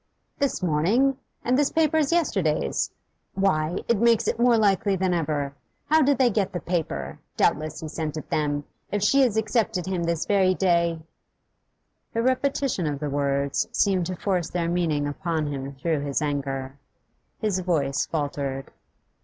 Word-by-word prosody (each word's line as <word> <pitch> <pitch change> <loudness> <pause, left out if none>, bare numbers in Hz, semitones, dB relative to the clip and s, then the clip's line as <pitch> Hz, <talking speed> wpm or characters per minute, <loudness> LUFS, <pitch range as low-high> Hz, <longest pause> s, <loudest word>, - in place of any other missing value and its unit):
'This 280 -8 0
morning? 195 - +2 0.3
And 255 +3 +3
this 290 - +3
paper 315 -1 +2
is 300 -1 +2
yesterday's. 190 - +1 0.5
Why, 175 -3 +1
it 235 -4 +2
makes 235 -1 +3
it - - -1
more 240 -1 +5
likely 200 -2 +2
than 185 -1 0
ever. 150 -4 -1 0.4
How 315 0 +6
did 285 -1 +3
they 255 -3 +4
get 200 -2 0
the 175 - -2
paper? 170 -3 -3 0.2
Doubtless 155 +1 +1
he 160 - -5
sent 155 0 -4
it 155 - -6
them. 145 -1 0 0.3
If 205 0 0
she 275 +6 +4
has 240 -5 +2
accepted 220 -3 0
him 185 -2 -2
this 165 -1 -1
very 190 -2 +3
day 170 -3 +1 0.6
' - - -49
The 230 - +1
repetition 260 - 0
of 145 -2 -2
the 150 -1 -3
words 140 0 0
seemed 185 -4 +2
to 185 - -3
force 180 -3 -1
their 170 -2 -1
meaning 160 -5 0
upon 160 +1 -2
him 135 0 -5
through 155 +3 -1
his 140 -1 -1
anger. 140 -2 -3 0.6
His 205 -4 0
voice 150 -6 0
failed. 140 -3 -3
175 Hz, 165 wpm, -25 LUFS, 150-215 Hz, 0.6 s, How